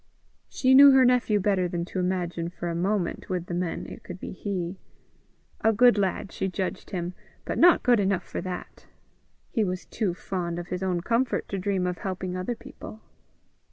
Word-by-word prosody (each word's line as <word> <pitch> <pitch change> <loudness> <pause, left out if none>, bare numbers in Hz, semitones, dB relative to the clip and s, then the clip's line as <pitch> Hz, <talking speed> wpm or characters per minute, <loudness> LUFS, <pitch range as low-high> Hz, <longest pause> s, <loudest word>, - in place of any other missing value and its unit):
She 260 0 +2
knew 280 +2 +10
her 265 -1 +6
nephew 245 -4 +3
better 190 -2 +1
than 170 -1 -3
to 185 - -4
imagine 175 -2 -1
for 175 -1 -5
a - - -2
moment, 185 +1 -1
with 180 -2 -2
the 175 - -6
men, 175 -1 -2
it - - -9
could 180 0 -8
be - - -6
he. 185 -2 -4 0.8
A 225 - +5
good 245 +3 +5
enough - - +3
lad 195 - -8
she - - -2
judged 185 0 -4
him, 180 -2 -3 0.3
but - - -2
not 350 0 +6
good 245 -3 +4
enough 190 -2 +1
for - - -5
that. 185 -1 -7 0.6
He 225 - +1
was 185 -1 -3
too 200 -6 -2
fond 175 -2 -4
of 175 0 -6
his 180 0 -3
own 180 -2 0
comfort 235 +6 0
to 195 - -3
dream 190 -1 0
of 180 -1 -2
helping 185 -1 -4
other 185 +6 -2
people! 235 -2 -11
185 Hz, 195 wpm, -26 LUFS, 180-215 Hz, 0.8 s, knew